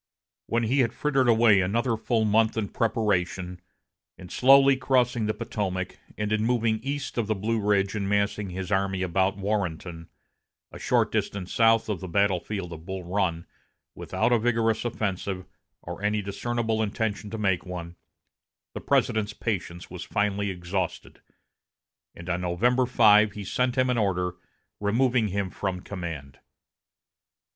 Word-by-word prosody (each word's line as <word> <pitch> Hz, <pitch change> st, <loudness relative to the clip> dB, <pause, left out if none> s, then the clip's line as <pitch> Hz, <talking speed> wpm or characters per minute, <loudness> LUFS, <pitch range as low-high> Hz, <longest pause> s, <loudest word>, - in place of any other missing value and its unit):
When 115 Hz, 0 st, 0 dB
he 125 Hz, +5 st, +1 dB
had 120 Hz, -2 st, +2 dB
frittered 135 Hz, -4 st, +1 dB
away 110 Hz, -4 st, +5 dB
another 115 Hz, +6 st, 0 dB
full 110 Hz, 0 st, 0 dB
month 110 Hz, +1 st, +2 dB
in 105 Hz, -3 st, -1 dB
preparation, 95 Hz, -5 st, -1 dB, 0.6 s
in 90 Hz, -, -11 dB
slowly 135 Hz, +3 st, +6 dB
crossing 125 Hz, -4 st, +1 dB
the 110 Hz, -, 0 dB
Potomac, 100 Hz, -5 st, -3 dB, 0.2 s
and 105 Hz, 0 st, -2 dB
in 110 Hz, 0 st, +1 dB
moving 115 Hz, -2 st, +1 dB
east 140 Hz, +1 st, -4 dB
of 110 Hz, -, -1 dB
the 110 Hz, -, 0 dB
Blue 110 Hz, +3 st, -1 dB
Ridge 100 Hz, -1 st, +1 dB
and 100 Hz, -2 st, -2 dB
massing 100 Hz, 0 st, 0 dB
his 90 Hz, 0 st, -5 dB
army 95 Hz, -1 st, 0 dB
about 95 Hz, +2 st, +1 dB
Warrenton, 90 Hz, -5 st, -3 dB, 0.6 s
a -, -, -10 dB
short -, -, +1 dB
distance 95 Hz, -2 st, -2 dB
south 115 Hz, -1 st, +4 dB
of 105 Hz, -5 st, -2 dB
the 95 Hz, -, -6 dB
battle 100 Hz, 0 st, +2 dB
field 95 Hz, -3 st, -5 dB
of 80 Hz, -1 st, -10 dB
Bull 95 Hz, +1 st, -5 dB
Run, 85 Hz, -2 st, -1 dB, 0.5 s
without -, -, -1 dB
a 120 Hz, -, +4 dB
vigorous 115 Hz, -1 st, +1 dB
offensive, 95 Hz, -4 st, -3 dB, 0.4 s
or 85 Hz, +3 st, -7 dB
any 105 Hz, 0 st, 0 dB
discernible 110 Hz, +2 st, -2 dB
intention 105 Hz, -1 st, -2 dB
to 110 Hz, -, -5 dB
make 95 Hz, -4 st, +1 dB
one, 90 Hz, -1 st, -7 dB, 0.8 s
the -, -, -6 dB
President's 110 Hz, -1 st, +1 dB
patience 90 Hz, -7 st, -4 dB
was 90 Hz, 0 st, -6 dB
finally 100 Hz, 0 st, -1 dB
exhausted, 90 Hz, 0 st, -4 dB, 0.9 s
and 85 Hz, -, -10 dB
on 90 Hz, 0 st, -1 dB
November 120 Hz, +9 st, +2 dB
5 105 Hz, -3 st, +5 dB
he 105 Hz, -, -6 dB
sent 125 Hz, +6 st, -1 dB
him 130 Hz, 0 st, +3 dB
an 120 Hz, -, +1 dB
order 90 Hz, -3 st, 0 dB, 0.5 s
removing 120 Hz, +2 st, +2 dB
him 100 Hz, -1 st, -2 dB
from 95 Hz, -2 st, -3 dB
command. 85 Hz, -8 st, -7 dB
105 Hz, 150 wpm, -26 LUFS, 95-115 Hz, 0.9 s, slowly